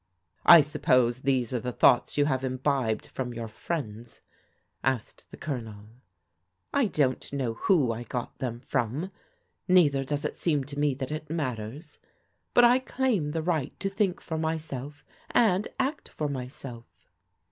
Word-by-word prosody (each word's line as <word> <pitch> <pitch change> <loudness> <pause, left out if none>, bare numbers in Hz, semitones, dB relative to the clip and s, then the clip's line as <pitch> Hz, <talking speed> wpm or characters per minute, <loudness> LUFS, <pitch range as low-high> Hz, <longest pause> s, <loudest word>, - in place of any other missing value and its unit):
" 85 - -40
I - - +7
suppose 135 -5 +2
these 130 -3 +1
are 125 - +1
the 125 +2 -3
thoughts 120 +3 +4
you 145 - +4
have 130 -2 0
imbibed 130 -3 0
from 125 -2 -5
your 115 -1 -4
friends? 115 -2 -5 0.3
" - - -42 0.3
asked 130 -4 -2
the - - -11
Colonel. 110 -7 -6 0.4
" 80 -2 -50 0.3
I 275 -5 +3
don't 140 -8 0
know 130 -5 -1
who 140 -1 +2
I 115 +1 -4
got 120 0 -5
them 120 -2 -3
from, 135 - -2 0.6
neither 150 -7 +4
does 145 +2 -3
it - - -2
seem 150 -5 0
to 145 +1 -7
me 145 -2 +2
that 130 +1 -5
it 155 0 -5
matters. 130 - -4 0.6
But 245 - +7
I 245 +2 +6
claim 250 - 0
the 160 +1 -2
right 160 -6 -1
to 195 - -1
think 195 -2 0
for 160 -2 -4
myself, 150 -3 -4 0.2
and 210 -3 +3
act 275 +3 -1
for 150 - -3
myself." 125 -3 -7
140 Hz, 165 wpm, -28 LUFS, 125-160 Hz, 0.6 s, I